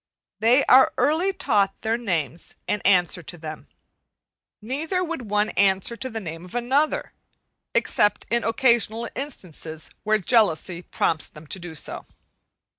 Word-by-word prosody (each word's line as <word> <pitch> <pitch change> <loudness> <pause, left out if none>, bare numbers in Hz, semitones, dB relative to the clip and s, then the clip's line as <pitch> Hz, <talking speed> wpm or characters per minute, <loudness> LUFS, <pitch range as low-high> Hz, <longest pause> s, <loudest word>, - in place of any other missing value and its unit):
They 240 +6 +4
are 260 +1 +7
early 315 +9 +2
taught 210 - 0
their 225 +1 0
names 175 -8 -3
and 210 - -1
answer 180 -2 +3
to 175 +2 -9
them. 155 -1 -8 0.9
Neither 305 - -2
would 320 - -5
one 210 +1 +1
answer 195 +3 +2
to 260 +2 -4
the 225 -2 -5
name 165 -4 -7
of 180 +5 -12
another, 265 +6 0 0.6
except 205 0 +2
in 235 0 +2
occasional 230 -1 +2
instances 170 - -7
where 215 0 +2
jealousy 185 -5 +2
prompts 160 -3 -1
them 150 +1 -13
to 190 - -4
do 175 -2 -8
so. - - -5
215 Hz, 140 wpm, -24 LUFS, 175-250 Hz, 0.9 s, are